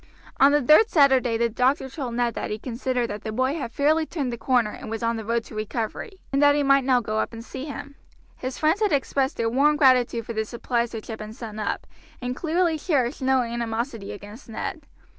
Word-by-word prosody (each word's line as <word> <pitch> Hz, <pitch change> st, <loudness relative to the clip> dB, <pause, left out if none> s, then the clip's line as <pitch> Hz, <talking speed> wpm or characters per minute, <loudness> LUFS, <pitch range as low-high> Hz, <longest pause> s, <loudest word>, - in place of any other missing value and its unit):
On 275 Hz, +1 st, +7 dB
the 295 Hz, -1 st, +3 dB
third 310 Hz, -, +6 dB
Saturday 265 Hz, -6 st, +4 dB
the 235 Hz, +1 st, +2 dB
doctor 255 Hz, +4 st, +1 dB
told 260 Hz, -4 st, -5 dB
Ned 240 Hz, -1 st, +1 dB
that -, -, -4 dB
he 210 Hz, -, -2 dB
considered 245 Hz, 0 st, -2 dB
that 205 Hz, 0 st, -5 dB
the 220 Hz, -, -4 dB
boy 260 Hz, +5 st, 0 dB
had 270 Hz, -8 st, -4 dB
fairly 310 Hz, +4 st, +2 dB
turned 275 Hz, -7 st, -3 dB
the -, -, -1 dB
corner 245 Hz, -5 st, +2 dB
and -, -, -9 dB
was 225 Hz, +1 st, -4 dB
on 230 Hz, 0 st, +1 dB
the 225 Hz, -, -5 dB
road 230 Hz, +1 st, 0 dB
to -, -, -13 dB
recovery, 220 Hz, -, -4 dB, 0.2 s
and 275 Hz, -, +2 dB
that 290 Hz, 0 st, +6 dB
he 290 Hz, -, +2 dB
might 275 Hz, 0 st, +4 dB
now 255 Hz, -2 st, +3 dB
go 215 Hz, -1 st, -2 dB
up -, -, -2 dB
and 230 Hz, 0 st, -8 dB
see 265 Hz, +2 st, -7 dB
him. 285 Hz, -1 st, -7 dB, 0.4 s
His 255 Hz, 0 st, -5 dB
friends 320 Hz, +7 st, +2 dB
had 420 Hz, -, +2 dB
expressed 275 Hz, 0 st, 0 dB
their 230 Hz, -, 0 dB
warm 280 Hz, +6 st, +3 dB
gratitude 250 Hz, -5 st, +3 dB
for 230 Hz, -, -5 dB
the 220 Hz, 0 st, 0 dB
supplies 235 Hz, +1 st, -2 dB
which 225 Hz, -2 st, -6 dB
had 220 Hz, -1 st, -6 dB
been 215 Hz, 0 st, -7 dB
sent 220 Hz, -3 st, -8 dB
up, 210 Hz, -, -2 dB, 0.3 s
and 250 Hz, 0 st, -3 dB
clearly 335 Hz, 0 st, 0 dB
cherished 280 Hz, -5 st, 0 dB
no 260 Hz, -1 st, +3 dB
animosity 230 Hz, -2 st, -3 dB
against 205 Hz, +5 st, -11 dB
Ned. 280 Hz, +6 st, -5 dB
250 Hz, 230 wpm, -24 LUFS, 230-280 Hz, 0.4 s, On